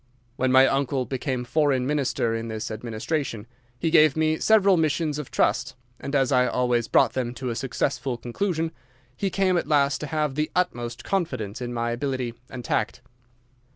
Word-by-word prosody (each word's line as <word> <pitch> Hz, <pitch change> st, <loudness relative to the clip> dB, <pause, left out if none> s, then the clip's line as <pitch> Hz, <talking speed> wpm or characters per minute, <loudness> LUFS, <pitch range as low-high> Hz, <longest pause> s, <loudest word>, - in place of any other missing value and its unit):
When 130 Hz, 0 st, +1 dB
my 130 Hz, +1 st, +7 dB
uncle 135 Hz, -1 st, 0 dB
became 130 Hz, -1 st, -3 dB
foreign 135 Hz, -1 st, +1 dB
minister 135 Hz, -5 st, 0 dB
in 115 Hz, 0 st, -3 dB
this 110 Hz, -1 st, -4 dB
administration 115 Hz, +2 st, -3 dB, 0.3 s
he 165 Hz, +4 st, -1 dB
gave 155 Hz, -3 st, +5 dB
me 155 Hz, 0 st, +1 dB
several 200 Hz, -3 st, +5 dB
missions 155 Hz, -2 st, 0 dB
of 150 Hz, -, -6 dB
trust, -, -, 0 dB, 0.2 s
and 140 Hz, -, -4 dB
as 135 Hz, -1 st, +2 dB
I 125 Hz, -1 st, +4 dB
always 125 Hz, -2 st, +1 dB
brought -, -, +3 dB
them 125 Hz, -2 st, -2 dB
to 125 Hz, -1 st, -3 dB
a -, -, -3 dB
successful 130 Hz, 0 st, -2 dB
conclusion, 160 Hz, -, -2 dB, 0.4 s
he 195 Hz, -, -1 dB
came 185 Hz, -1 st, +2 dB
at 170 Hz, -, -1 dB
last 140 Hz, -2 st, +2 dB
to 150 Hz, -, -5 dB
have 150 Hz, -1 st, -1 dB
the 150 Hz, +2 st, -1 dB
utmost 120 Hz, -10 st, -1 dB
confidence 125 Hz, -, -2 dB
in 120 Hz, -1 st, -4 dB
my 120 Hz, 0 st, -1 dB
ability 125 Hz, -1 st, -2 dB, 0.2 s
and 125 Hz, -2 st, -8 dB
tact. -, -, -1 dB
135 Hz, 175 wpm, -25 LUFS, 120-155 Hz, 0.4 s, my